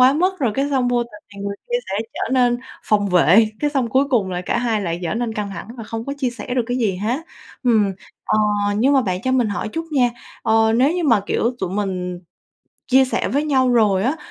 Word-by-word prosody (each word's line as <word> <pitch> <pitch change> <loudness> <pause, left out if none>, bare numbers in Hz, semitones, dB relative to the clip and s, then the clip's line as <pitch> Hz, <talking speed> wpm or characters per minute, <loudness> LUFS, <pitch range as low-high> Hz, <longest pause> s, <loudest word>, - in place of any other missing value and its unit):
quá 255 +2 +7
mức, 370 +5 +1
rồi 250 -8 0
cái 275 +3 0
xong 260 -3 +1
vô 245 -1 +2
tình 215 -3 -12
thì 200 - -9
người 200 0 -4
kia 485 - +2 0.2
sẽ 195 - 0 0.2
trở - - -3
nên 245 -2 +3 0.3
phòng 205 -1 +2
vệ, 180 +5 +5
cái 295 -1 +1
xong 265 -5 0
cuối 265 +4 +3
cùng 210 -7 +1
là 180 -1 -2
cả - - 0
hai 230 -3 0
lại 170 -3 -3
trở 170 +1 -2
nên 235 0 -2
căng 210 -2 -3
thẳng 195 - -8
và 230 - -7
không 225 +1 -5
có 275 - -4
chia 260 -3 0
sẻ 240 +1 -6
được 250 - +2
cái 245 +1 -1
gì 205 -6 0
hết, 230 - -1 0.4
ừm. 220 -5 +3 0.3
Ờ, 215 - +1 0.4
nhưng 255 +6 +3
mà 275 - +5
bạn 185 -4 -2
cho 260 - 0
mình 245 -4 +2
hỏi 205 +1 -3
chút 325 +9 -4
nha, 250 -4 +3 0.3
ờ, 220 0 +3
nếu 265 +6 +4
như 350 - -1
mà, 230 -8 +4
kiểu, 235 +3 0
tụi 185 -2 -3
mình 185 -3 -3 0.7
chia 265 0 +5
sẻ 260 - -1
với 285 +3 0
nhau 260 -4 +2
rồi 205 -5 +3
á, 265 +8 0
235 Hz, 250 wpm, -20 LUFS, 205-260 Hz, 0.7 s, quá